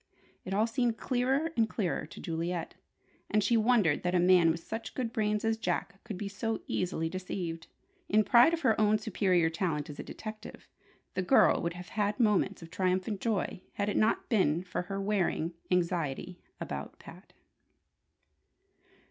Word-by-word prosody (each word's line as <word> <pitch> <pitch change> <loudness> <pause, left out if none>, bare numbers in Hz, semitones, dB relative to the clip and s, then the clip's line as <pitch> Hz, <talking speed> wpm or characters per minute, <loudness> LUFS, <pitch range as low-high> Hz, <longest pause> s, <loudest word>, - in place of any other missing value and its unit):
It 190 - -2
all 215 +2 +3
seemed 235 -1 0
clearer 265 +5 0
and 225 -2 +2
clearer 180 -8 -2
to - - -11
Juliet, 165 +1 -3 0.6
and 210 -1 +2
she 235 +4 +3
wondered 220 -9 +3
that 180 +1 0
a - - +4
man 175 -1 +5
with 165 +1 -1
such 225 0 -6
good 235 -3 -2
brains 210 -2 0
as 225 0 +1
Jack's 185 0 -2
could 215 -5 -6
be 205 - -4
so 220 +3 -3
easily 175 -3 -1
deceived. 175 -2 -5 0.4
In 215 +1 +4
pride 240 +8 +6
of 335 - -9
her 225 -5 +3
own 215 0 +4
superior 185 -6 +1
talent 160 -4 -2
as 145 - -12
a - - -4
detective, 215 0 -9 0.5
the 185 - -1
girl 180 - +4
would 170 0 -2
have 180 0 -9
had 210 +1 -1
moments 200 -5 +2
of 165 - -12
triumphant 185 +2 -1
joy 210 -5 -1
had 205 0 -1
it - - -2
not 215 - +2
been 175 -7 +2
for 185 - -3
her 195 +2 -5
wearing 195 -4 0 0.2
anxiety 175 -1 -1 0.2
about - - -6
Pat. - - -14
195 Hz, 170 wpm, -30 LUFS, 175-220 Hz, 0.6 s, pride